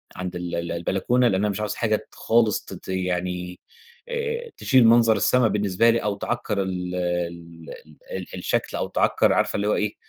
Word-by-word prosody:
عند 90 Hz, -1 st, -5 dB
ال 90 Hz, 0 st, -4 dB
ال 85 Hz, 0 st, -3 dB
البلكونة 95 Hz, +9 st, +1 dB
لأن 95 Hz, -2 st, +1 dB
أنا 105 Hz, -, +1 dB
مش 100 Hz, -, -3 dB
عايز 105 Hz, -1 st, -2 dB
حاجة 110 Hz, -2 st, +1 dB
ت -, -, -9 dB
خالص 115 Hz, -2 st, +2 dB
ت -, -, -9 dB
ت -, -, -11 dB
يعني 90 Hz, -1 st, -3 dB, 0.5 s
آآ، 470 Hz, 0 st, -3 dB
تشيل 130 Hz, -4 st, +4 dB
منظر 115 Hz, -1 st, +5 dB
السما 120 Hz, +3 st, +3 dB
بالنسبة 105 Hz, +1 st, +2 dB
لي 115 Hz, 0 st, +2 dB
أو 105 Hz, -1 st, -1 dB
تعكر 105 Hz, -1 st, -2 dB
ال 90 Hz, -1 st, -3 dB
ال 85 Hz, -2 st, -4 dB
ال 75 Hz, -1 st, -19 dB
ال 95 Hz, -1 st, -4 dB
الشكل، -, -, -2 dB
أو -, -, -2 dB
تعكر -, -, +2 dB
عارفة -, -, +1 dB
اللي 100 Hz, 0 st, 0 dB
هو -, -, +2 dB
إيه، 105 Hz, -1 st, -1 dB
100 Hz, 195 wpm, -24 LUFS, 90-115 Hz, 0.5 s, منظر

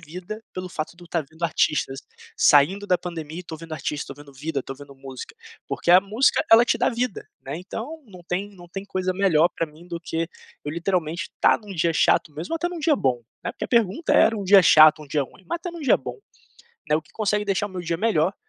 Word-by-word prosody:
vida, 180 Hz, +7 st, -8 dB
pelo 185 Hz, 0 st, -5 dB
fato 155 Hz, -1 st, -5 dB
de 175 Hz, -, -16 dB
eu -, -, -12 dB
estar 165 Hz, -2 st, -2 dB
vendo 160 Hz, +2 st, -17 dB
artistas, 150 Hz, -4 st, 0 dB, 0.4 s
saindo 185 Hz, +8 st, +4 dB
da 180 Hz, -2 st, +2 dB
pandemia 165 Hz, -2 st, -6 dB
e -, -, -10 dB
tô 160 Hz, -, -7 dB
vendo 165 Hz, 0 st, -11 dB
artista, 150 Hz, -1 st, -4 dB
tô -, -, -23 dB
vendo 145 Hz, -1 st, -14 dB
vida, 145 Hz, 0 st, -3 dB
tô 135 Hz, -, -7 dB
vendo 140 Hz, 0 st, -13 dB
música. 135 Hz, -, -9 dB, 0.3 s
Porque -, -, -1 dB
a 180 Hz, +1 st, +9 dB
música 215 Hz, +7 st, +2 dB
ela 230 Hz, +1 st, +9 dB
te -, -, +2 dB
dá -, -, +3 dB
vida, 240 Hz, -3 st, -3 dB, 0.2 s
né, 135 Hz, +3 st, -5 dB
então 235 Hz, -, -7 dB
não 185 Hz, -4 st, -13 dB
tem 195 Hz, +3 st, -2 dB
não 175 Hz, -1 st, -13 dB
tem 195 Hz, +3 st, -6 dB
coisa 185 Hz, -2 st, -2 dB
melhor 175 Hz, -4 st, +4 dB
pra -, -, 0 dB
mim 160 Hz, +3 st, -17 dB
do 170 Hz, -1 st, -4 dB
que 165 Hz, -1 st, -3 dB, 0.4 s
eu, 145 Hz, -, -3 dB
literalmente, 170 Hz, 0 st, -2 dB
estar -, -, +3 dB
num 205 Hz, -3 st, -10 dB
dia 165 Hz, 0 st, +1 dB
chato 155 Hz, -, +3 dB
mesmo, 160 Hz, -, -6 dB
ou -, -, +1 dB
até 345 Hz, +2 st, -1 dB
num 350 Hz, -1 st, -6 dB
dia 310 Hz, 0 st, +3 dB
bom, 125 Hz, -, 0 dB, 0.2 s
né, -, -, -2 dB
porque -, -, -6 dB
a -, -, -6 dB
pergunta 230 Hz, -, +1 dB
era 225 Hz, -, +5 dB
um 200 Hz, -, -4 dB
dia 195 Hz, +1 st, +8 dB
chato, 155 Hz, -1 st, +7 dB
um -, -, -12 dB
dia 145 Hz, 0 st, +1 dB
ruim, 185 Hz, +8 st, -13 dB
mas -, -, -1 dB
até 355 Hz, -, -5 dB
num 340 Hz, -1 st, -9 dB
dia 285 Hz, -, +4 dB
bom, -, -, -8 dB, 0.7 s
né, 150 Hz, -, +4 dB
o 155 Hz, -, -3 dB
que -, -, -25 dB
consegue 210 Hz, -1 st, 0 dB
deixar 200 Hz, 0 st, 0 dB
o -, -, -11 dB
meu 185 Hz, -1 st, -5 dB
dia 170 Hz, 0 st, -2 dB
melhor, 185 Hz, -3 st, +1 dB
175 Hz, 250 wpm, -24 LUFS, 155-200 Hz, 0.7 s, a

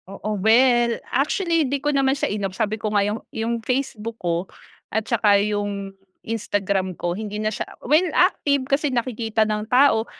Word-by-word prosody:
Oo. 215 Hz, +2 st, -4 dB
Well, 240 Hz, +2 st, +4 dB, 0.2 s
actually 330 Hz, +5 st, +1 dB
hindi 280 Hz, -, 0 dB
ko 295 Hz, +2 st, -1 dB
naman 275 Hz, 0 st, +2 dB
siya -, -, -1 dB
in-off 195 Hz, -3 st, -3 dB
sabi 215 Hz, -1 st, -1 dB
ko 215 Hz, -, -1 dB
nga 200 Hz, -1 st, +3 dB
yung, 210 Hz, +2 st, -2 dB
yung 230 Hz, +1 st, -2 dB
Facebook 230 Hz, -3 st, -3 dB
ko, 175 Hz, 0 st, -2 dB, 0.4 s
at 220 Hz, 0 st, -1 dB
saka 210 Hz, -4 st, +3 dB
yung 205 Hz, -1 st, -2 dB, 0.3 s
Instagram 200 Hz, -4 st, -1 dB
ko 175 Hz, +1 st, -1 dB
hindi 210 Hz, -1 st, -5 dB
na 215 Hz, -, +1 dB
siya 215 Hz, -, -4 dB, 0.2 s
well 305 Hz, +7 st, +3 dB
active 280 Hz, -2 st, +2 dB
kasi 280 Hz, 0 st, +1 dB
nakikita 230 Hz, -2 st, -1 dB
ng 215 Hz, 0 st, 0 dB
tao, 250 Hz, -4 st, +4 dB
220 Hz, 170 wpm, -22 LUFS, 205-260 Hz, 0.4 s, Well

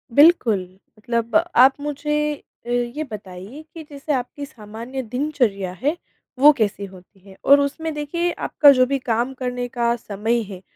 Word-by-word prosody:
बिल्कुल। 285 Hz, -, +5 dB, 0.4 s
मतलब 230 Hz, +2 st, -3 dB
आप 300 Hz, -6 st, +5 dB
मुझे 295 Hz, +1 st, -1 dB, 0.3 s
अ, -, -, -8 dB
ये 245 Hz, +5 st, -1 dB
बताइए 200 Hz, +6 st, -9 dB
कि 325 Hz, -, -9 dB
जैसे 285 Hz, +1 st, -4 dB
आपकी 270 Hz, +2 st, -4 dB
सामान्य 235 Hz, 0 st, -8 dB
दिनचर्या 240 Hz, -6 st, -1 dB
है, 295 Hz, +5 st, +1 dB, 0.4 s
वो 295 Hz, +3 st, +9 dB
कैसी 205 Hz, -3 st, -1 dB
होती 190 Hz, +1 st, -16 dB
है? 190 Hz, 0 st, -16 dB
और 280 Hz, +1 st, +6 dB
उसमें, 310 Hz, +3 st, -2 dB
देखिए, 340 Hz, +4 st, -2 dB
आपका 290 Hz, -3 st, +4 dB
जो 255 Hz, -2 st, +4 dB
भी 275 Hz, +2 st, -1 dB
काम 240 Hz, +1 st, -1 dB
करने 250 Hz, -1 st, -4 dB
का 235 Hz, -1 st, 0 dB
समय 225 Hz, +2 st, -2 dB
है, 185 Hz, -2 st, -9 dB
250 Hz, 155 wpm, -21 LUFS, 220-290 Hz, 0.4 s, वो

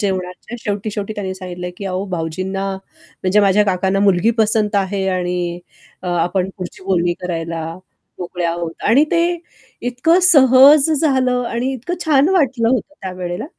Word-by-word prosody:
जेवणाच्या 190 Hz, +3 st, -4 dB
शेवटी-शेवटी 205 Hz, 0 st, -4 dB
त्यांनी 190 Hz, -2 st, -4 dB
सांगितलं, 180 Hz, -1 st, -7 dB
की 200 Hz, -, -8 dB
"अहो 190 Hz, 0 st, -3 dB
भाऊजींना" 185 Hz, +3 st, -3 dB
म्हणजे 190 Hz, +1 st, -3 dB
माझ्या 205 Hz, +1 st, +4 dB
काकांना 190 Hz, 0 st, 0 dB
"मुलगी 195 Hz, +1 st, +3 dB
पसंत 215 Hz, -1 st, +1 dB
आहे. 195 Hz, 0 st, -1 dB
आणि 180 Hz, -1 st, -2 dB, 0.4 s
अ, -, -, -7 dB
आपण 175 Hz, +2 st, 0 dB
पुढची 180 Hz, -1 st, -8 dB
बोलणी 175 Hz, -2 st, +1 dB
करायला 165 Hz, -2 st, -4 dB, 0.5 s
मोकळे 180 Hz, 0 st, -4 dB
आहोत." 170 Hz, 0 st, -2 dB, 0.2 s
आणि 265 Hz, +7 st, +5 dB
ते 340 Hz, 0 st, +3 dB, 0.5 s
इतकं 245 Hz, +8 st, +2 dB
सहज 280 Hz, -2 st, +7 dB
झालं 255 Hz, -5 st, +1 dB
आणि 245 Hz, +3 st, -2 dB
इतकं 265 Hz, +7 st, -4 dB
छान 290 Hz, -1 st, +4 dB
वाटलं 265 Hz, -11 st, +2 dB
होतं 260 Hz, +4 st, -1 dB
त्यावेळेला. 180 Hz, -2 st, -5 dB
195 Hz, 140 wpm, -18 LUFS, 180-245 Hz, 0.5 s, सहज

